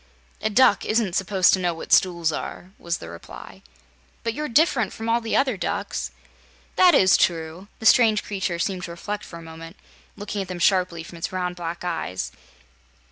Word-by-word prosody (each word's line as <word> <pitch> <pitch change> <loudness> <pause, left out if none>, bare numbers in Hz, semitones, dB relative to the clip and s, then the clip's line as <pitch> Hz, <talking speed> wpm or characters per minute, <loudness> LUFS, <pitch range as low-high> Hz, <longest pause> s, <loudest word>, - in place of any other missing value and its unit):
"A 220 - 0
duck 220 -1 +4
isn't 215 -4 0
supposed 190 -1 +3
to 190 - +3
know 175 -2 0
what 165 - -3
stools 170 -3 +3
are," 180 +4 -6
was 170 0 -2
the - - -10
reply. 85 0 -11 0.6
"But 230 0 -1
you're 300 +4 -4
diff'rent 255 -2 +2
from 225 - -6
all 230 +1 +2
other 265 -6 +2
ducks." - - -3 0.7
"That 365 -2 +6
is 185 0 +6
true." 165 +2 0
The 220 - -9
strange 220 -2 +5
creature 190 -4 -3
seemed 180 +1 -2
to - - -9
reflect 205 +5 -5
for 170 - -10
a 165 - -11
moment, 165 +2 -10 0.4
looking 205 0 -4
at 190 - -5
them 180 -1 -5
sharply 180 -2 +1
from 170 +1 -11
its - - -3
round 180 -1 -2
black 170 0 -5
eyes. 165 - -3
185 Hz, 185 wpm, -23 LUFS, 170-215 Hz, 0.7 s, That